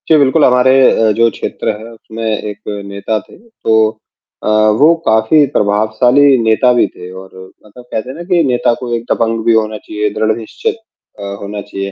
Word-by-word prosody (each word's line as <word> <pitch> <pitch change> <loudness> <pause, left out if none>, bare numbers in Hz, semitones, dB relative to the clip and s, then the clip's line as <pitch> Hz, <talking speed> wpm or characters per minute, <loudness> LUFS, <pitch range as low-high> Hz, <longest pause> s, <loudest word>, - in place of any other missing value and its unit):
जी, 160 - +6
बिल्कुल 145 +2 +3
हमारे 125 0 +4 0.2
अ, 110 -1 +2
जो 115 +2 +2
क्षेत्र - - -4
है 115 +2 -11
उसमें 115 0 -10
एक 105 -1 -7 0.2
नेता 100 +2 -3
थे - - -17
तो 225 - -4 0.7
अ, - - -3
वो 110 +8 +4
काफ़ी 110 +7 +3
प्रभावशाली 110 +7 +3
नेता 110 +3 +3
भी 120 - +3
थे 90 0 -10
और 95 0 -11 0.4
मतलब, 115 +4 -15
कहते 110 +4 -4
हैं 130 - -7
ना 170 - -7
कि 175 -2 +3
नेता 125 -3 +1
को 120 -2 -5
एक 115 - -4
दबंग 115 -1 0
भी 115 - +4
होना 110 -1 0
चाहिए, 105 0 -3
दृढ़ 110 0 0
निश्चित 110 -2 -4 0.4
अ, - - -7 0.2
होना 100 +1 -6
चाहिए, 100 -1 -6
110 Hz, 185 wpm, -14 LUFS, 105-125 Hz, 0.7 s, जी